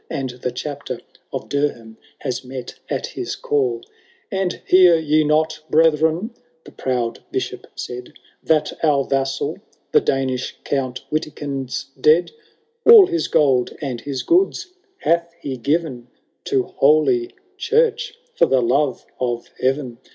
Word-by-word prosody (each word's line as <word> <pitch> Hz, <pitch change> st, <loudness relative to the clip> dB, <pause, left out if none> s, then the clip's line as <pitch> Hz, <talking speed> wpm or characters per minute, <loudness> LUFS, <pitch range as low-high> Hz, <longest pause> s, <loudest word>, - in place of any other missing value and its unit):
And 130 Hz, -2 st, -3 dB
the 125 Hz, 0 st, -4 dB
Chapter 145 Hz, +1 st, -5 dB, 0.3 s
of -, -, -5 dB
Durham 140 Hz, -6 st, -2 dB, 0.3 s
has 130 Hz, -1 st, -3 dB
met 130 Hz, -1 st, -7 dB, 0.2 s
at -, -, -2 dB
his 375 Hz, -7 st, -5 dB
call. 415 Hz, -5 st, 0 dB, 0.5 s
And 190 Hz, -2 st, -1 dB
hear 180 Hz, -2 st, +6 dB
ye 155 Hz, -1 st, +2 dB
not, 155 Hz, +1 st, +1 dB
brethren, 160 Hz, -, +3 dB, 0.3 s
the -, -, -13 dB
proud 125 Hz, -3 st, -2 dB
Bishop -, -, -4 dB
said, 125 Hz, 0 st, -7 dB, 0.2 s
*« -, -, -37 dB
That 155 Hz, +1 st, +1 dB
our 145 Hz, -3 st, +3 dB
vassal, 135 Hz, 0 st, -1 dB, 0.3 s
the -, -, +5 dB
Danish 130 Hz, -2 st, -1 dB
Count 130 Hz, -3 st, -2 dB
Witikind*s 140 Hz, -3 st, -3 dB
dead? 155 Hz, +3 st, +4 dB, 0.5 s
All 450 Hz, -4 st, +10 dB
his 345 Hz, -2 st, -1 dB
gold 130 Hz, -4 st, +2 dB
and 130 Hz, -5 st, -4 dB
his 140 Hz, -2 st, -4 dB
goods 365 Hz, 0 st, +1 dB, 0.2 s
hath 170 Hz, -, 0 dB
he 135 Hz, -5 st, -4 dB
given 135 Hz, -1 st, -1 dB, 0.4 s
To 400 Hz, -2 st, +1 dB
holy 355 Hz, -, +2 dB, 0.2 s
church 460 Hz, +1 st, +1 dB, 0.2 s
for -, -, +3 dB
the 135 Hz, -, +3 dB
love 130 Hz, +2 st, +1 dB
of 120 Hz, -2 st, -2 dB
heaven. 130 Hz, -2 st, -1 dB
150 Hz, 135 wpm, -21 LUFS, 130-180 Hz, 0.5 s, All